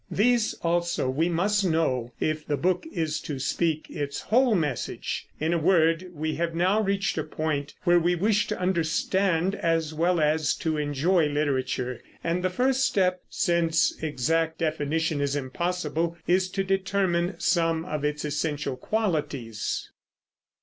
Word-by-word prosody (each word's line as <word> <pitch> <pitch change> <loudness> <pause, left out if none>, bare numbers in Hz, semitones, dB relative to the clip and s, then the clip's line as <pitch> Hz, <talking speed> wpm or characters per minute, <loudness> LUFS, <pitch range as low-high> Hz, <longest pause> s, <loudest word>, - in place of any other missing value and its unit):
These 235 +1 +2
also 170 -5 0
we 160 +6 +1
must 200 +5 +1
know, 155 -9 0
if 155 0 -1
the 145 - 0
book 180 - 0
is 160 -4 -1
to 145 - -5
speak 155 +4 -1
its 145 -1 -4
whole 245 0 +3
message. 150 -8 -2
In 160 +2 +1
a 170 - +1
word, 165 +1 +3
we 155 -1 -3
have 165 0 -1
now 185 +5 +3
reached 195 -3 0
a - - -1
point 145 -2 -3
where 175 -1 +5
we 175 +1 +2
wish 210 +4 +2
to 210 - -3
understand 180 +1 +1
as 165 -4 0
well 170 +2 +2
as 155 0 +2
to 160 -1 -2
enjoy 150 +4 +2
literature; 130 -4 -1 0.2
and 170 +2 -1
the 185 - +2
first 260 +7 +1
step, 185 -6 +2
since 170 -2 +2
exact 160 +2 0
definition 160 -1 -1
is 140 0 0
impossible, 165 +3 -2
is 185 +1 +2
to 195 +1 -1
determine 190 -2 0
some 165 -2 +1
of 150 -5 -3
its 150 0 -1
essential 150 -2 -2
qualities. 150 - -2
165 Hz, 150 wpm, -26 LUFS, 150-185 Hz, 0.2 s, where